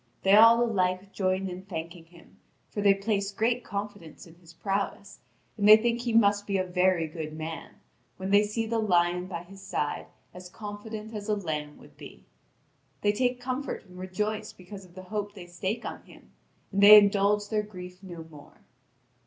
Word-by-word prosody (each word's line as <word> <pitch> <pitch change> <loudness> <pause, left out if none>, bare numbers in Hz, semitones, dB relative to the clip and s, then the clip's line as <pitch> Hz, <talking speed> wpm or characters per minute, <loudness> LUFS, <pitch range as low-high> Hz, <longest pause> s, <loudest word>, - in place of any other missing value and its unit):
They 195 - +4
all 230 +3 +8
alike 190 -3 -1
join 190 0 0
in 180 0 -6
thanking 170 -2 -7
him, 170 0 -19 0.3
for 205 - -3
they 200 -1 +5
place 200 0 -1
great 235 +4 0
confidence 200 -5 -7
in 165 - -15
his 170 -1 -18
prowess, 200 +2 -4 0.4
and 205 +1 +4
they 215 - +11
think 235 +1 0
he 240 -1 -2
must 205 -2 +3
be 200 -1 0
a 185 - +1
very 180 -2 +1
good 155 -1 -6
man, 160 +1 -7 0.4
when 190 +1 -4
they 205 +1 +6
see 210 +2 -2
the 225 0 -1
lion 180 -3 +1
by 170 -2 -6
his 195 +2 -14
side 185 -6 -3 0.3
as 180 0 -10
confident 215 +2 -8
as 210 0 -6
a 210 - +2
lamb 150 -6 -4
would - - -18
be. - - -13 0.8
They 205 - +3
take 245 +3 0
comfort 255 +1 -4
and 180 -1 -14
rejoice 210 +3 -3
because 190 +1 -11
of 175 -1 -20
the 185 - -9
hope 205 +2 -4
they 185 -3 -9
stake 185 +6 -4
on - - -6
him, - - -18 0.4
and 200 0 0
they 210 +1 +11
indulge 205 0 +3
their 215 -1 +1
grief 180 -3 -10
no 175 -4 -9
more. 150 -3 -16
195 Hz, 185 wpm, -28 LUFS, 180-210 Hz, 0.8 s, they